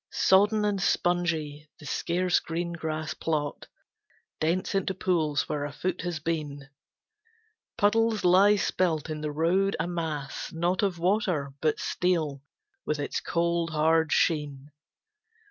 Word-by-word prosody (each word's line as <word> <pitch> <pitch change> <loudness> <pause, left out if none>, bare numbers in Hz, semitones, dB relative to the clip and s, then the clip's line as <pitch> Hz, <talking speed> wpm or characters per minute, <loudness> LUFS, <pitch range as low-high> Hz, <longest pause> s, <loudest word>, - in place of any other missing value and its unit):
Sodden 210 +3 +3
and 200 -2 0
spongy, 160 -5 0
the 150 - -13
scarce 175 +3 +1
green 170 +1 -4
grass 155 -2 -3
plot 150 -3 -3 0.7
Dents 170 +6 0
into 195 -1 0
pools 160 -6 0
where 145 -1 -2
a 145 - -4
foot 185 +3 -3
has 175 -2 -3
been. 145 -3 -4 1.1
Puddles 220 0 +2
lie 195 +4 +6
spilt 165 -6 0
in 155 -1 -4
the 150 -1 -3
road 175 +6 +1
a - - 0
mass, 160 -5 -4
not 175 +5 0
Of 195 -4 0
water, 175 -6 0
but 155 -1 +1
steel, 160 -6 -1 0.4
with 150 - -1
its 145 - -2
cold, 170 0 0
hard 160 0 +2
sheen. 145 -3 0
165 Hz, 130 wpm, -27 LUFS, 150-185 Hz, 1.1 s, lie